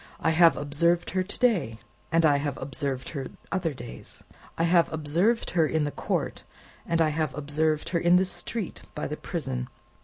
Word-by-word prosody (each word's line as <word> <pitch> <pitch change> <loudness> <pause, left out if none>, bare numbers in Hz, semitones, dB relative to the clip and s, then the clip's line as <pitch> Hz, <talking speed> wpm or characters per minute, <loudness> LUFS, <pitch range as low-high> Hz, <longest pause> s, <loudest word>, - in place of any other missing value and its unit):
I 160 - +2
have 165 +1 +6
observed 170 +4 +1
her 185 - +1
to 185 - -5
day, 180 - +2 0.3
and 165 0 +4
I 145 -2 +5
have 140 -1 -2
observed 135 -1 -3
her 135 -4 -4 0.2
other 180 -4 0
days. 120 -4 -9 0.3
I 165 - +1
have 170 0 +4
observed 165 +9 +1
her 165 -3 +3
in 160 -1 +1
the 145 - -1
court, - - -2 0.4
and 165 0 +1
I 160 -1 +4
have 155 0 -1
observed 150 +1 0
her 170 - +1
in 175 +1 +4
the 185 +1 +5
street 200 +2 -3
by 150 - -3
the 150 - -3
prison. 130 -8 -3
160 Hz, 185 wpm, -27 LUFS, 145-175 Hz, 0.4 s, have